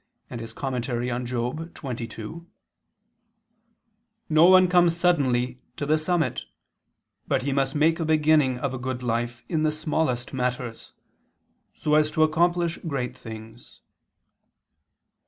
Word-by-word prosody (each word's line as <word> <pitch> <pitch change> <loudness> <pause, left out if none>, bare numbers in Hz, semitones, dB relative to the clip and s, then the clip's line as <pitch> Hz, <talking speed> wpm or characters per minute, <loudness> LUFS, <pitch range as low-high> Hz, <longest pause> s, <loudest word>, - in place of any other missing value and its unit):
and 120 - -5
Moral. 115 +3 -4
xxii): 120 0 -4 2.0
"No 155 +1 +6
one 185 0 +7
comes 175 -1 +4
suddenly 130 -8 +1 0.2
to 145 - -2
the 150 +2 +3
summit; 155 - 0 0.8
but - - +1
he 140 0 -1
must 135 0 0
make 160 +3 +3
a 165 - -1
beginning 155 -4 +3
of 130 +1 -3
a 130 - -4
good 125 0 -4
life 120 0 -2
in 160 -3 0
the 155 0 +2
smallest 155 -5 -2
matters, 125 -2 -3 0.8
so 150 -1 -1
as 155 0 +4
to 155 +1 +2
accomplish 170 +2 +1
great 135 -5 -3
things." 110 +1 -11
135 Hz, 120 wpm, -25 LUFS, 120-155 Hz, 2.0 s, one